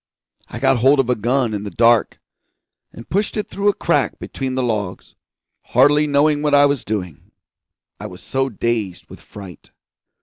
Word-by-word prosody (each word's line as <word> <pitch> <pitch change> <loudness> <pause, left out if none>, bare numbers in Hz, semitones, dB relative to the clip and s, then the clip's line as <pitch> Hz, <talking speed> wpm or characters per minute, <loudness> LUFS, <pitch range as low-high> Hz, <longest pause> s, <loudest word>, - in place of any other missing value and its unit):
I - - -7
got 135 -1 +2
hold 135 +4 +4
of 125 -2 +1
a - - +2
gun 120 +1 0
in 105 - -3
the 105 - -5
dark, 115 +1 +2 0.7
and 115 - -12
pushed 205 +4 -2
it 210 - -3
through 200 +1 0
a - - +2
crack - - 0
between 130 -1 -5
the 130 - -1
logs, 105 -6 -4 0.5
hardly 145 +4 +3
knowing 145 +1 +2
what 150 -1 +2
I 145 0 +6
was 140 -2 0
doing, 90 -8 -5 0.7
I 105 - -6
was 90 -3 -13
so 135 0 -1
dazed 110 -4 -3
with - - -11
fright. 95 -4 -13
125 Hz, 175 wpm, -19 LUFS, 105-145 Hz, 0.7 s, I